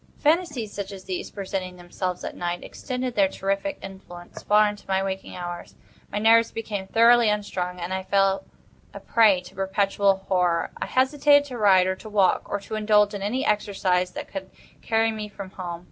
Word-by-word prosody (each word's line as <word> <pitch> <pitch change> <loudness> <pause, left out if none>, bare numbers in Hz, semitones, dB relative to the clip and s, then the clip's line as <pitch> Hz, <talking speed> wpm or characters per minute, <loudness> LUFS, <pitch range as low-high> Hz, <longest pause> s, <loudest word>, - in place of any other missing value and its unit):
Phantasies 300 - 0
such 200 -1 -5
as 195 -1 -9
these, 185 -1 -5
presenting 190 -2 -5
themselves 180 +1 -5
at - - -5
night, 175 0 -3
extended 255 -1 -4
their 200 -3 +3
terrific 195 +10 -2
influence 185 -2 -10
far 210 0 +4
into 205 0 -6
my 190 0 +1
waking 190 0 -5
hours. 175 -1 -7 0.4
My - - -3
nerves 225 +2 +4
became 205 -4 -5
thoroughly 230 +1 +5
unstrung, 185 -4 -2
and 175 +2 -4
I 190 - -2
fell 195 +4 +1 0.5
a - - -6
prey 210 -5 +4
to 180 - -14
perpetual 195 +1 +1
horror. 175 -3 +1
I - - -2
hesitated 285 +2 +4
to 250 - -6
ride, 190 -3 +5
or 190 0 0
to 215 - -10
walk, 200 -3 +2
or 205 - -1
to 220 - -10
indulge 210 -1 +3
in 200 - -5
any 245 +7 -1
exercise 190 -3 +1
that - - -8
would 190 -1 -6 0.3
carry 225 0 +1
me 215 -1 -6
from 195 -2 -9
home. 175 -3 -6
200 Hz, 185 wpm, -24 LUFS, 185-220 Hz, 0.5 s, thoroughly